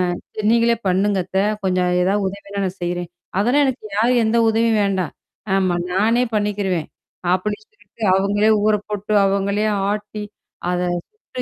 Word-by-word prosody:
"அ -, -, -6 dB, 0.2 s
சரி 215 Hz, -1 st, -2 dB
நீங்களே 235 Hz, 0 st, +3 dB
பண்ணுங்க 195 Hz, +2 st, +2 dB
அத்த. 190 Hz, +1 st, -1 dB, 0.2 s
கொஞ்சம் 180 Hz, -1 st, +1 dB
ஏதாவது 195 Hz, +2 st, +1 dB
உதவின்னா 200 Hz, +1 st, -6 dB
நான் 185 Hz, +1 st, -5 dB
செய்றேன்", 175 Hz, 0 st, -3 dB, 0.3 s
"அதெல்லாம் 250 Hz, +8 st, +3 dB
எனக்கு 260 Hz, -4 st, -2 dB
யாரு 235 Hz, +4 st, +3 dB
எந்த 220 Hz, +2 st, +2 dB
உதவியும் 225 Hz, 0 st, +2 dB
வேண்டாம். 190 Hz, -5 st, -1 dB, 0.4 s
ஆமா. 185 Hz, -2 st, +1 dB, 0.2 s
நானே 225 Hz, +6 st, +3 dB
பண்ணிக்கிருவேன்." 200 Hz, -5 st, -1 dB, 0.5 s
அப்படின்னு 210 Hz, +3 st, -2 dB
சொல்லிட்டு, 205 Hz, +2 st, -13 dB
அவுங்களே 205 Hz, +2 st, +2 dB, 0.2 s
ஊற 215 Hz, 0 st, +4 dB
போட்டு, 210 Hz, 0 st, -3 dB
அவங்களே 200 Hz, +1 st, 0 dB, 0.3 s
ஆட்டி, 210 Hz, 0 st, -5 dB, 0.5 s
அத 180 Hz, 0 st, 0 dB, 0.3 s
சுட்டு 430 Hz, -12 st, -9 dB
205 Hz, 145 wpm, -20 LUFS, 190-215 Hz, 0.5 s, ஊற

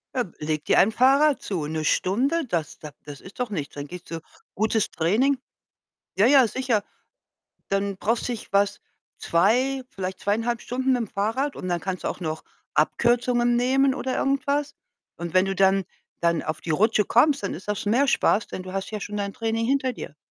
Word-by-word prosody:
Ja, 250 Hz, -, +2 dB, 0.2 s
leg 155 Hz, 0 st, -2 dB
dir -, -, +3 dB
ein 215 Hz, +4 st, +4 dB
Fahrrad 275 Hz, +4 st, +4 dB
zu. 175 Hz, -7 st, -3 dB
'Ne 155 Hz, 0 st, -3 dB
Stunde? 260 Hz, -, +1 dB
Das 165 Hz, -6 st, -3 dB
da 150 Hz, -1 st, -9 dB
das 145 Hz, -1 st, -9 dB
ist 190 Hz, -, -14 dB
doch 245 Hz, -, -1 dB
nichts. 155 Hz, -10 st, -5 dB
Dann 145 Hz, 0 st, -6 dB
gehst 180 Hz, +3 st, -10 dB
du 165 Hz, -, -4 dB, 0.3 s
Gutes 220 Hz, +1 st, +1 dB
Training 225 Hz, +12 st, +2 dB, 0.8 s
Ja, 205 Hz, -, +5 dB
ja, 265 Hz, -1 st, +6 dB
sicher. 235 Hz, -3 st, 0 dB, 0.9 s
Dann 195 Hz, 0 st, -1 dB
brauchst 230 Hz, +4 st, 0 dB
dich 240 Hz, -3 st, -5 dB
was 200 Hz, +1 st, +2 dB, 0.4 s
2, 250 Hz, +10 st, +2 dB
vielleicht 185 Hz, -1 st, -5 dB
2,5 230 Hz, +3 st, -1 dB
Stunden 260 Hz, +1 st, 0 dB
mitm 240 Hz, -4 st, 0 dB
Fahrrad 225 Hz, +9 st, -1 dB
und 185 Hz, -, -6 dB
dann 175 Hz, -1 st, 0 dB
kannst 185 Hz, 0 st, -4 dB
du -, -, 0 dB
auch -, -, -5 dB
noch 155 Hz, -2 st, -4 dB, 0.3 s
Abkürzungen 240 Hz, 0 st, +2 dB
nehmen 265 Hz, +2 st, +3 dB
oder 260 Hz, -1 st, -2 dB
irgendwas. 280 Hz, +1 st, 0 dB, 0.4 s
Und 170 Hz, 0 st, -6 dB
wenn 185 Hz, -, +5 dB
du 195 Hz, 0 st, -2 dB
dann 195 Hz, 0 st, +3 dB, 0.4 s
dann 170 Hz, -1 st, +2 dB
auf 155 Hz, 0 st, -4 dB
die 165 Hz, -, -5 dB
Rutsche 210 Hz, +6 st, +3 dB
kommst, 285 Hz, +6 st, +3 dB
dann -, -, -2 dB
ist 185 Hz, +5 st, -9 dB
das 210 Hz, 0 st, -2 dB
mehr 255 Hz, +7 st, +2 dB
Spaß, 215 Hz, -, +2 dB
denn 185 Hz, -, -6 dB
du 185 Hz, -, -8 dB
hast 195 Hz, 0 st, -4 dB
ja 215 Hz, -, -3 dB
schon 210 Hz, +1 st, -5 dB
dein 200 Hz, -1 st, -3 dB
Training 225 Hz, 0 st, -1 dB
hinter 265 Hz, -1 st, +1 dB
dir. 155 Hz, -, -9 dB
215 Hz, 190 wpm, -24 LUFS, 185-255 Hz, 0.9 s, ja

